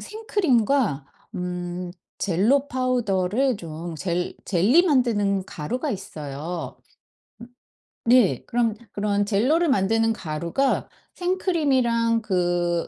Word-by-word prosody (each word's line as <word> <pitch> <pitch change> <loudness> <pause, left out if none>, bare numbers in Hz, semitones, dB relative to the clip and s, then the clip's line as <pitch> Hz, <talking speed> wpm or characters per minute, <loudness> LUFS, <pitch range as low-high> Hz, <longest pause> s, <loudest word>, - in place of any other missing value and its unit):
생크림과 275 - 0 0.3
음 180 0 -4 0.3
젤로 225 +10 +2
파우더를 245 -2 0
좀 165 -1 -7
젤 175 +1 -2
젤리 205 - +4
만드는 205 - +2
가루가 250 - -4
있어요. 165 - -6 1.3
음 - - +2
네. 225 - +4
그럼 230 -2 0 0.2
그런 205 0 0
젤로를 260 +12 +2
만드는 225 -1 +2
가루가 170 - -1 0.3
생크림이랑 265 -11 +1
그 175 -3 0
210 Hz, 210 characters per minute, -24 LUFS, 175-255 Hz, 1.3 s, 젤리